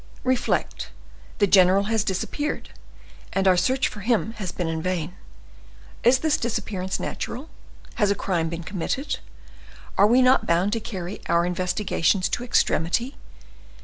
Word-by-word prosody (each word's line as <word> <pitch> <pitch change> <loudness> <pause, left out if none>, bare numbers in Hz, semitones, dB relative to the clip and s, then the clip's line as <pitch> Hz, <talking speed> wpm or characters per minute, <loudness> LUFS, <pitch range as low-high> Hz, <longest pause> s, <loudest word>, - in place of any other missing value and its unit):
Reflect; 255 -1 0 0.5
the 205 - +4
general 190 0 +5
has 220 0 0
disappeared, 220 +10 -3 0.6
and 195 0 +1
our 185 - +6
search 255 +9 +2
for 210 - -8
him 220 +1 +1
has 190 -5 -4
been 175 - -3
in 160 0 -2
vain. 180 -1 -2 0.9
Is 245 +2 +6
this 300 +3 +1
disappearance 195 -5 -3
natural? 275 +7 -5 0.5
Has 205 - +4
a 200 - +2
crime 170 -5 -1
been 170 0 -5
committed? 255 - -3 0.8
Are 200 - +7
we 250 +4 +5
not 255 +1 +4
bound 180 +5 +2
to 230 - 0
carry 200 -4 -6
our 170 0 +3
investigations 180 +1 0
to 245 - -2
extremity? 235 - +1
200 Hz, 145 wpm, -24 LUFS, 180-235 Hz, 0.9 s, Are